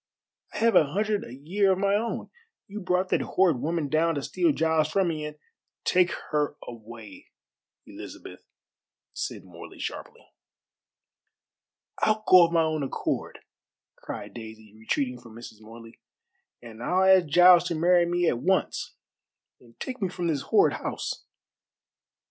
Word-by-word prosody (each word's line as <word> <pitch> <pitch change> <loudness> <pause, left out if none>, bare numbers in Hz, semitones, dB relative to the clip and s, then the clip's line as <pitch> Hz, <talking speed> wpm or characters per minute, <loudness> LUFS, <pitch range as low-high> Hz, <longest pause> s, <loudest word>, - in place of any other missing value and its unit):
I - - -4
have 230 0 +2
a 145 -2 +4
hundred 210 +1 0
a - - -10
year 185 +9 +1
of - - -3
my 200 +1 +1
own. 225 +3 -2 0.4
You 205 +2 -7
brought 185 -1 0
that - - +1
horrid 175 -9 +2
woman 160 +1 -2
down 160 +3 +1
to 140 - -3
steal 340 - +1
Giles 160 - +1
from 190 0 +1
me, 155 -2 -4
and 150 0 -10 0.3
" - - -59
"Take 180 -1 +3 0.2
her 150 -1 0
away, 115 -3 -11 0.6
Elizabeth," - - -11 0.7
said - - -5
Morley - - -12
sharply. - - -7 1.7
"I'll 215 0 +1
go 180 -2 +8
of - - -10
my 165 -1 +3
own 155 -1 -1
accord," 135 - -3 0.5
cried - - -8
Daisy, 110 -2 -11
retreating 125 +3 -2
from 115 -2 -14
Mrs. 115 -2 -11
Morley; 115 +1 -13 0.6
"and 115 -1 -11
I'll 180 +9 +1
ask 190 -3 +5
Giles 175 +3 +6
to 170 - -2
marry 175 +2 +3
me 175 0 0
at 120 - +1
once, 190 +7 -1 0.6
and 115 -2 -22
take 255 -3 -6
me 190 - 0
from 175 -1 -5
this 155 -5 0
horrid - - +3
house. - - -5
165 Hz, 155 wpm, -26 LUFS, 125-185 Hz, 1.7 s, go